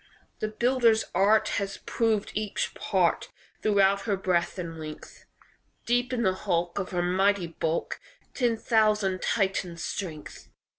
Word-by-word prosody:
"The 215 - -1
builder's 230 0 +2
art 205 +4 +4
Has 195 -1 -4
proved 220 -3 0
each 210 -1 -2
part - - 0 0.3
Throughout 200 -1 +3
her 205 -3 0
breadth 180 -1 0
and 165 -3 -6
length; 155 -1 -9 0.6
Deep 245 +1 +1
in 240 -2 0
the 190 -3 +3
hulk, 175 0 -1
Of 190 - -3
her 175 -1 -1
mighty 190 +1 +2
bulk, 165 0 -3 0.3
Ten 240 -3 +1
thousand 215 -4 +2
Titans' 190 -5 -1
strength." 160 -6 -6
195 Hz, 135 wpm, -27 LUFS, 175-220 Hz, 0.6 s, art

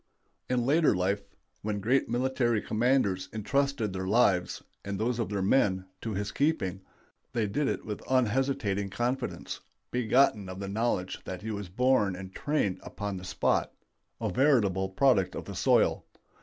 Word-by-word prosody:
In 125 -1 +1
later 150 -2 +4
life, 95 +3 0 0.4
when 105 -1 -2
great 125 +7 +1
military 120 -2 +1
commanders 110 -5 +1
intrusted 115 -1 0
their 95 0 -3
lives, 95 -4 +2 0.2
and 100 0 -3
those 115 +3 -1
of 115 - -1
their 100 -2 -1
men, 95 -3 +2 0.2
to 110 -3 -3
his 100 +1 -2
keeping, 100 - 0 0.5
they 115 -2 +1
did 135 +8 0
it - - -2
with 105 -2 -5
an 130 - +4
unhesitating 105 -5 0
confidence, 125 +5 -3 0.3
begotten 120 -4 +2
of 95 +1 -7
the 100 - -4
knowledge 100 -3 -1
that 95 +1 -6
he 110 - -3
was 100 -3 -5
born 105 -2 +2
and 95 0 -9
trained 145 -11 0
upon 100 -1 -5
the 90 - -8
spot; 95 +1 0 0.5
a - - -1
veritable 100 -7 +3
product 95 -3 +3
of - - -5
the - - -7
soil. - - +3
105 Hz, 160 wpm, -29 LUFS, 95-125 Hz, 0.5 s, later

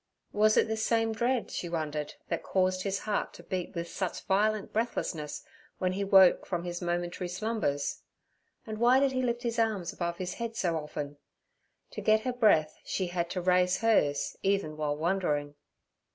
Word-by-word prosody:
Was 215 +1 +4
it - - +4
this 220 0 -1
same 225 -1 +2
dread, 240 +1 0
she 175 - -4
wondered, 150 -3 -3
that - - -2
caused 185 -1 +1
his 195 0 -1
heart 210 -1 -2
to - - -12
beat 185 -1 -4
with 170 0 -3
such 185 +1 -4
violent 210 +2 +1
breathlessness 175 -9 -2 0.3
when 185 -1 0
he 200 +2 -1
woke 190 -2 +6
from 175 -2 -2
his 175 0 -4
momentary 175 +1 -2
slumbers? 180 -7 -2 0.6
and 215 -1 -6
why 245 +3 +5
did 275 -1 +3
he 255 -1 0
lift 240 -1 -1
his 235 -1 -1
arms 210 -6 0
above 170 -1 -3
his 180 -1 -4
head 235 -1 -5
so 175 -7 0
often? 150 -2 -5 0.7
To - - -6
get 215 0 +4
her 250 +2 -2
breath 185 -11 +3
she 190 - -2
had 175 -1 -2
to 180 - -3
raise 180 +1 +3
hers 150 -11 +2
even 195 -6 0
while 150 -1 -1
wondering. 155 -4 0
185 Hz, 180 wpm, -30 LUFS, 170-220 Hz, 0.7 s, woke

